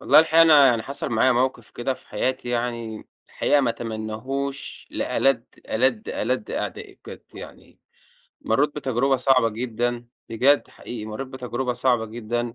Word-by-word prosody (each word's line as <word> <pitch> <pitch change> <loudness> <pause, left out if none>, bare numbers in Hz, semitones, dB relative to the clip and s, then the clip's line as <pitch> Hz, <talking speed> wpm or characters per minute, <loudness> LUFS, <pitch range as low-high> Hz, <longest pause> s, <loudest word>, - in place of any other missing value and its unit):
والله - - +6
الحقيقة 160 +1 +6
أنا 150 -4 +7
يعني 115 -3 +2
حصل 140 - -5
معايا 120 +3 +3
موقف 120 -3 -1
كده 130 +2 -2
في - - -18
حياتي 130 -1 -2
يعني، 120 -2 -3 0.2
الحقيقة 145 - +2
ما 130 - +1
اتمناهوش 115 +5 -5
لألد، 135 -3 +1 0.2
ألد، 120 -1 +1
ألد 125 -3 -2
أعدائي - - -5
بجد - - -10
يعني. - - -12 0.6
مرِّيت 145 +6 +1
بتجربة 135 0 +1
صعبة 125 -2 +3
جدًا، 120 +1 -3 0.2
بجد 135 +6 +3
حقيقي 120 -3 -8
مرِّيت 120 +5 -6
بتجربة 125 -1 -3
صعبة 120 -2 +1
جدًا. 120 +1 -4
120 Hz, 145 wpm, -24 LUFS, 115-135 Hz, 0.6 s, أنا